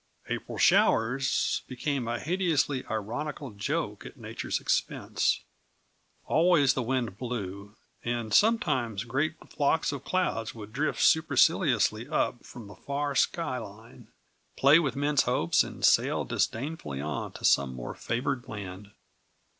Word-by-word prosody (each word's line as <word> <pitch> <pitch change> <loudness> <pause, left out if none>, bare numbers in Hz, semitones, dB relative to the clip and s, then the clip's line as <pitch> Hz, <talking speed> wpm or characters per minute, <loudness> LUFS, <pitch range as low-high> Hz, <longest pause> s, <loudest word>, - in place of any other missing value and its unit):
"April - - -4
showers" 125 +4 +3
became 130 -1 -2
a 120 +1 -2
hideously 160 -6 0
ironical 125 +6 -4
joke 100 -1 -3
at - - -11
nature's - - -4
expense. - - 0 0.8
Always 160 -5 +4
the 130 - -1
wind 120 -4 -2
blew, 100 -4 -5 0.3
and 120 -2 -2
sometimes 130 - +2
great 140 +7 -1 0.2
flocks 150 +2 +1
of 140 -2 -6
clouds 120 -13 -1
would 110 -1 -10
drift 150 +4 0
superciliously 135 - +3
up 120 - -1
from 120 - -11
the 100 - -11
far 140 0 -3
sky 135 -3 0
line, 110 +1 -12 0.5
play 140 +4 +6
with 140 -6 -1
men's 145 0 +2
hopes, 85 -9 +2
and - - -3
sail - - +3
disdainfully 115 - -2
on 75 0 -4
to - - -6
some 70 -2 +3
more - - -6
favored 125 +2 -2
land. 100 -2 -8
125 Hz, 130 wpm, -28 LUFS, 110-145 Hz, 0.8 s, play